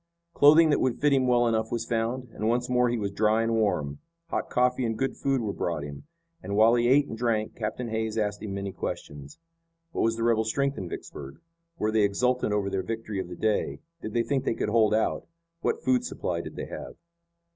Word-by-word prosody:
Clothing 155 +2 +6
that - - +3
would 130 -2 0
fit 145 -1 +3
him 130 -2 +3
well 120 -1 +4
enough 110 -1 0
was 115 -1 -2
found, 120 +2 -2
and 110 - -1
once 120 +1 +1
more 125 -1 +3
he 120 - 0
was 100 -3 -2
dry 110 +2 +2
and 115 0 0
warm. 75 -10 0 0.3
Hot - - -2
coffee 125 +1 +2
and 115 -2 -1
good 135 +2 -1
food 135 -2 0
were 105 -3 -2
brought 85 -6 -2
him, 70 - -9 0.3
and 100 - -4
while 110 +2 +6
he 120 0 +3
ate 140 +3 +4
and - - -6
drank 110 -2 -1
Captain 120 +2 -3
Hays 110 0 -2
asked 105 -2 -1
him 105 -2 -5
many 100 0 -3
questions. 75 - -6 0.5
What - - -2
was 115 0 +2
the 115 - -3
rebel 115 -1 +3
strength 140 +5 0
in 90 - -5
Vicksburg? 70 -4 -8 0.4
Were 105 +1 0
they 110 0 +3
exultant 125 +4 +1
over 105 -1 0
their 95 -1 -1
victory 110 -1 -4
of 95 - -3
the 90 - -7
day? 110 +2 0 0.2
Did 110 - -6
they 120 - +3
think 135 +1 -1
they - - 0
could - - -1
hold 110 -1 +4
out? 110 - 0 0.3
What 455 0 -1
food 255 -1 +2
supply 245 - -3
did - - -9
they - - -4
have? - - -8
115 Hz, 225 wpm, -27 LUFS, 105-125 Hz, 0.5 s, Clothing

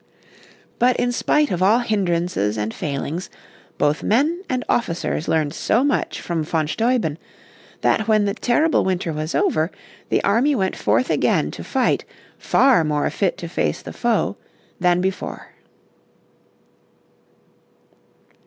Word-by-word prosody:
But 245 +1 +4
in 245 -1 0
spite 295 +4 +1
of 180 -1 -1
all 205 +5 +5
hindrances 175 - 0
and 105 +1 -2
failings, 150 +4 -4 0.5
both 150 +1 +1
men 300 - +1
and 255 -1 -1
officers 170 -7 -1
learned 155 -2 +1
so 230 +8 +1
much 285 - 0
from 170 -2 -2
von 155 0 -1
Steuben 220 - 0 0.6
that 220 - +1
when 215 -2 +3
the 200 - 0
terrible 290 +8 +2
winter 180 -3 -1
was 155 +2 -3
over 155 +2 +1 0.4
the - - +1
army 245 +8 +3
went 190 -5 0
forth 255 - +1
again - - +1
to - - -8
fight - - 0 0.4
far 260 -10 +4
more 150 -1 0
fit 195 -4 0
to 170 - -6
face 165 - -2
the - - -8
foe 230 -3 0 0.4
than 180 -1 +3
before. 190 +1 -4
190 Hz, 135 wpm, -21 LUFS, 160-240 Hz, 0.6 s, all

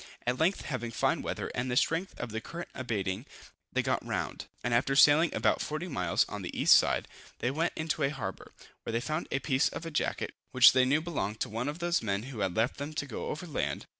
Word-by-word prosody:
At 125 +1 0
length, 170 +5 +2
having 130 -4 -4
fine 115 - +1
weather, - - -4
and 120 +1 -2
the 125 - 0
strength 165 +7 0
of 120 - -4
the 110 +1 -3
current 170 +7 -7
abating, 110 -1 -3 0.4
they - - +1
got - - 0
round; - - -3 0.2
and 125 - 0
after 130 +3 +2
sailing 150 +3 +6
about - - +2
40 155 +4 -3
miles 90 - +1
on - - -6
the - - -5
east - - +7
side, - - +3 0.3
they 125 - -1
went 160 +5 0
into 160 0 -2
a 140 - +3
harbor, 115 -10 -6 0.3
where 115 - -5
they 115 - +2
found 155 +6 -3
a - - 0
piece 135 0 +2
of 165 - -7
a 165 - -5
jacket, 150 - -1 0.2
which 130 0 +9
they 130 0 +4
knew 145 +4 +2
belonged 110 - -3
to - - 0
one 115 +5 -3
of 145 +2 -3
those 175 0 +1
men 100 -1 -1
who 125 -3 -7
had 95 -3 -1
left 115 +3 +1
them 145 +2 -5
to 145 - -2
go 130 - -5
over 160 +4 -4
land. 155 - -2
135 Hz, 235 wpm, -30 LUFS, 115-155 Hz, 0.4 s, which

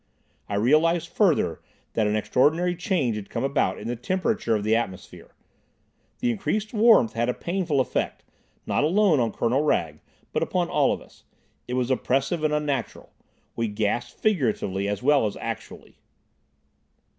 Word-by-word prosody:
I 100 - -2
realised 155 +9 +2
further, 160 - +1 0.3
that 110 -2 +1
an 105 - 0
extraordinary 150 +12 +2
change 165 - 0
had 100 - -8
come - - -3
about 140 +1 0
in - - -7
the 120 - -2
temperature 185 - -1
of 105 - -2
the 110 +1 +2
atmosphere. 95 -6 -5 0.9
The 245 -1 +2
increased 215 0 -2
warmth 215 - +5
had 120 +1 0
a 125 - -1
painful 170 -5 -1
effect, 130 - -1 0.4
not - - 0
alone 175 -1 +3
on 115 -2 +1
Colonel 120 +6 +1
Wragge, 80 - 0 0.3
but - - 0
upon - - 0
all - - +2
of - - -3
us. - - -22 0.4
It 125 - -3
was 125 0 0
oppressive 135 +5 0
and 155 - +2
unnatural. 145 -5 -2 0.4
We 115 -1 -1
gasped 105 +3 -2
figuratively 110 - 0
as 105 +4 -3
well 140 -4 +4
as 100 - -6
actually. - - -7
135 Hz, 155 wpm, -25 LUFS, 110-170 Hz, 0.9 s, warmth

